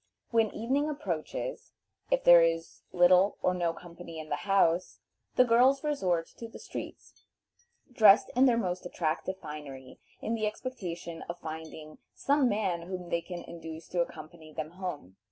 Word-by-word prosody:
When 225 Hz, -2 st, +3 dB
evening 275 Hz, +7 st, 0 dB
approaches, 240 Hz, -, -4 dB, 0.4 s
if -, -, +1 dB
there 175 Hz, -1 st, +9 dB
is 165 Hz, 0 st, -1 dB
little 180 Hz, +2 st, +5 dB
or 185 Hz, -, +3 dB
no 175 Hz, -2 st, 0 dB
company 170 Hz, -1 st, -10 dB
in 155 Hz, -1 st, -7 dB
the -, -, 0 dB
house, 180 Hz, -2 st, +2 dB, 0.4 s
the 255 Hz, -, +6 dB
girls 255 Hz, +4 st, +4 dB
resort 185 Hz, -, 0 dB
to 230 Hz, -, -7 dB
the 225 Hz, -, -11 dB
streets, -, -, -9 dB, 0.7 s
dressed 210 Hz, -3 st, +6 dB
in 260 Hz, +2 st, +6 dB
their 240 Hz, -2 st, +3 dB
most 180 Hz, -5 st, -2 dB
attractive 175 Hz, +2 st, -2 dB
finery, 145 Hz, -6 st, -9 dB, 0.2 s
in 225 Hz, -, -3 dB
the 215 Hz, -2 st, 0 dB
expectation 180 Hz, -8 st, -6 dB
of 170 Hz, -, -4 dB
finding 160 Hz, -1 st, -8 dB, 0.2 s
some 280 Hz, -2 st, +2 dB
man 190 Hz, -6 st, -1 dB
whom 180 Hz, -2 st, -6 dB
they 170 Hz, -, +1 dB
can 175 Hz, 0 st, -7 dB
induce 165 Hz, -1 st, -9 dB
to 175 Hz, -, 0 dB
accompany 155 Hz, -1 st, -7 dB
them 155 Hz, 0 st, -5 dB
home. 175 Hz, -, -7 dB
175 Hz, 155 wpm, -30 LUFS, 165-220 Hz, 0.7 s, there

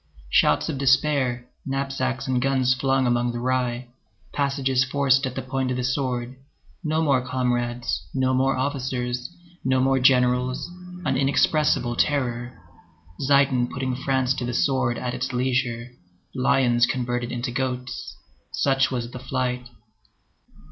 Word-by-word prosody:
Shouts 75 Hz, -, +4 dB
despair, 135 Hz, -3 st, +1 dB, 0.2 s
knapsacks 135 Hz, -1 st, -2 dB
and 125 Hz, -1 st, +1 dB
guns 130 Hz, -1 st, +2 dB
flung 135 Hz, 0 st, +1 dB
among 120 Hz, 0 st, +1 dB
the 120 Hz, -, -3 dB
rye, 125 Hz, -1 st, -1 dB, 0.4 s
passages 135 Hz, -2 st, +1 dB
forced 135 Hz, 0 st, +2 dB
at 130 Hz, -, -6 dB
the 130 Hz, -, -3 dB
point 130 Hz, 0 st, -2 dB
of 125 Hz, -, -1 dB
the 125 Hz, -, -2 dB
sword, 125 Hz, -1 st, -2 dB, 0.5 s
no 155 Hz, 0 st, +1 dB
more 140 Hz, -4 st, +3 dB
comrades, 125 Hz, -1 st, -1 dB
no 130 Hz, -1 st, +1 dB
more 130 Hz, +1 st, +2 dB
officers, 130 Hz, -2 st, -2 dB, 0.3 s
no 130 Hz, 0 st, +2 dB
more 135 Hz, +1 st, +3 dB
generals, 125 Hz, 0 st, +2 dB, 0.4 s
an 135 Hz, -3 st, +1 dB
inexpressible 140 Hz, -2 st, +2 dB
terror. 120 Hz, -3 st, -1 dB, 0.7 s
Zieten 135 Hz, -3 st, +3 dB
putting 130 Hz, -1 st, -2 dB
France 130 Hz, 0 st, +1 dB
to 130 Hz, -, -4 dB
the 120 Hz, 0 st, -3 dB
sword 130 Hz, -4 st, +1 dB
at 125 Hz, 0 st, -3 dB
its 125 Hz, +1 st, -3 dB
leisure. 125 Hz, -1 st, -1 dB, 0.4 s
Lions 125 Hz, -2 st, +3 dB
converted 120 Hz, -2 st, -2 dB
into 120 Hz, 0 st, -3 dB
goats. 125 Hz, 0 st, -4 dB, 0.4 s
Such 135 Hz, -1 st, +2 dB
was 120 Hz, -2 st, -3 dB
the 125 Hz, -, -7 dB
flight. 125 Hz, -1 st, -2 dB
130 Hz, 135 wpm, -24 LUFS, 125-135 Hz, 0.7 s, Shouts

